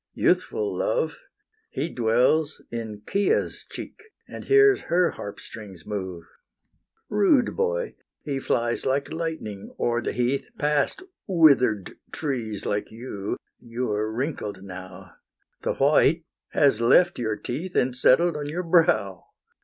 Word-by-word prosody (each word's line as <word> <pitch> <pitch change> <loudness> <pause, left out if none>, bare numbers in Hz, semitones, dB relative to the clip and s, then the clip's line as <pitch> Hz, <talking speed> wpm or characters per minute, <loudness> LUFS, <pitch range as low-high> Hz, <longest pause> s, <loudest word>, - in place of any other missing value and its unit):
Youthful 435 -2 +1
Love! - - -1 0.5
He - - -2
dwells 125 +4 +2
in 110 -3 -6
Chia's 200 0 +1
cheek, - - -8 0.3
And - - -9
hears 410 -1 +5
her 175 0 +3
harp 100 - -8
strings 100 -6 -10
move. 95 -5 -5 0.8
Rude 220 +5 +3
boy, 475 +1 -1 0.3
he 140 -3 -2
flies 120 -2 0
like 140 +2 -1
lightning 160 -12 -5
o'er 120 0 +1
the - - -2
heath 125 - -1
Past 150 - 0 0.2
wither'd 135 - +4
trees 120 -9 -3
like 105 0 -1
you; 110 -3 -5 0.2
you're 115 -3 -2
wrinkled 110 -6 -4
now; 95 -2 -10 0.4
The - - -1
white 150 +3 +4 0.3
has 135 -6 +3
left 175 +9 +4
your 110 -3 -1
teeth 165 +9 -5
And 125 0 +2
settled 150 +6 +4
on 145 -1 -4
your 175 +4 -3
brow. 160 - +2
130 Hz, 125 wpm, -25 LUFS, 110-170 Hz, 0.8 s, hears